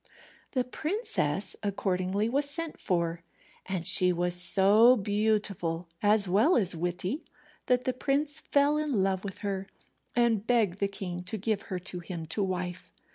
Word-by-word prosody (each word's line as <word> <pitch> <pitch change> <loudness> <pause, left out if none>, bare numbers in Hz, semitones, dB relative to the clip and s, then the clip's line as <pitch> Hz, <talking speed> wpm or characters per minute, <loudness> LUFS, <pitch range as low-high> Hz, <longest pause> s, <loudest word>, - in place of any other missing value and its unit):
The 255 -3 +1
princess 305 - -3
accordingly 195 0 -1
was 280 +4 0
sent 325 +2 -5
for, 170 -2 -2 0.5
and 185 -3 -4
she 180 +2 +6
was 175 0 0
so 200 +7 +6
beautiful, 205 -5 -1
as 205 -1 +5
well 215 - +3
as 190 -6 +3
witty, 180 - -3 0.4
that 250 0 +2
the 255 - -1
prince 285 +4 -1
fell 290 +1 +1
in 280 -10 0
love 190 -1 -1
with 195 -2 -7
her, 195 -1 -3 0.5
and 230 -3 +1
begged 215 -6 +1
the 200 - +1
king 185 -3 -6
to 200 +5 -3
give 215 0 -2
her 185 - -3
to 180 0 -5
him 170 -1 -7
to 210 - -1
wife. 180 -1 -5
200 Hz, 155 wpm, -28 LUFS, 180-245 Hz, 0.5 s, she